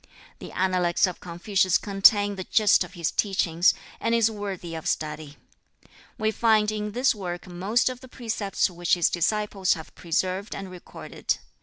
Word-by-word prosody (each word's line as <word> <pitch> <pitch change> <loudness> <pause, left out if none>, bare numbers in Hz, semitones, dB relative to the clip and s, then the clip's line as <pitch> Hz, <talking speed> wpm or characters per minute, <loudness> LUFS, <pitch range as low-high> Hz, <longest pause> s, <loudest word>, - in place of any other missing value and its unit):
The - - -9
Analects 180 -2 +2
of 180 -2 -5
Confucius 185 +1 +1
contain 205 0 +4
the 190 - -5
gist 215 -3 +4
of - - -12
his 170 -2 -1
teachings, 180 -4 +2 0.2
and 230 - +1
is 230 -1 +3
worthy 195 -5 -6
of 160 -1 -5
study. 150 -1 -3 0.8
We 220 0 +1
find 220 -2 +3
in 210 -1 -4
this 250 +4 +3
work 180 -4 -6
most 190 +7 0
of 255 -1 -2
the 260 - -12
precepts 220 -6 -1
which 175 -1 0
his 175 -2 +2
disciples 200 +2 +1
have 160 -1 -11
preserved 185 +4 -2
and 195 -1 -7
recorded. 180 -1 -4
195 Hz, 160 wpm, -25 LUFS, 175-215 Hz, 0.8 s, contain